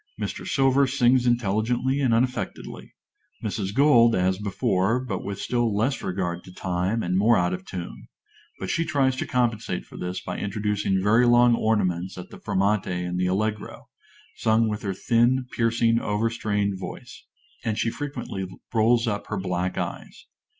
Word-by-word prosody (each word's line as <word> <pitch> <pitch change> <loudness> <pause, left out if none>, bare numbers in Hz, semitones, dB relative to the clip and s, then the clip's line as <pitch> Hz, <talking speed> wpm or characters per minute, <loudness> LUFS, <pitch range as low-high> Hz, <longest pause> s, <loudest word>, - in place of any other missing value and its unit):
Mr. - - -4
Silver 135 0 +3
sings 125 -1 +3
intelligently 120 +4 +1
and 130 -4 +2
unaffectedly; 125 +2 -2 0.5
Mrs. 100 -2 -2
Gold, 120 -2 +5
as 95 +1 +1
before, 105 +1 0
but 115 -7 -4
with 100 0 -5
still 120 -4 0
less 130 +6 0
regard 90 -2 -3
to 90 - -11
time, 90 +5 -1
and 90 +1 -1
more 110 +5 +4
out 90 0 +1
of 90 +1 -6
tune; 65 -9 -7 0.5
but 95 - -3
she 165 - +1
tries 135 -4 +1
to - - -3
compensate 120 -3 -1
for - - -13
this 90 +1 -4
by - - -5
introducing 100 -2 -1
very 115 +4 +4
long 120 0 +6
ornaments 95 -6 0
at 90 - -9
the - - -11
fermate 100 +2 0
in 90 -1 -3
the 90 0 +1
allegro, 105 +3 -3 0.5
sung 110 +1 +2
with 105 -1 -3
her 95 -2 -3
thin, 120 +4 +2
piercing, 115 0 +2
over 105 +2 -1
strained 105 -4 -1
voice; - - -9 0.4
and 110 -2 -1
she 115 0 0
frequently 120 -10 -5 0.3
rolls 115 +1 +3
up 105 -2 -2
her 105 - -3
black 90 -1 -2
eyes. - - -5
110 Hz, 165 wpm, -25 LUFS, 95-120 Hz, 0.5 s, long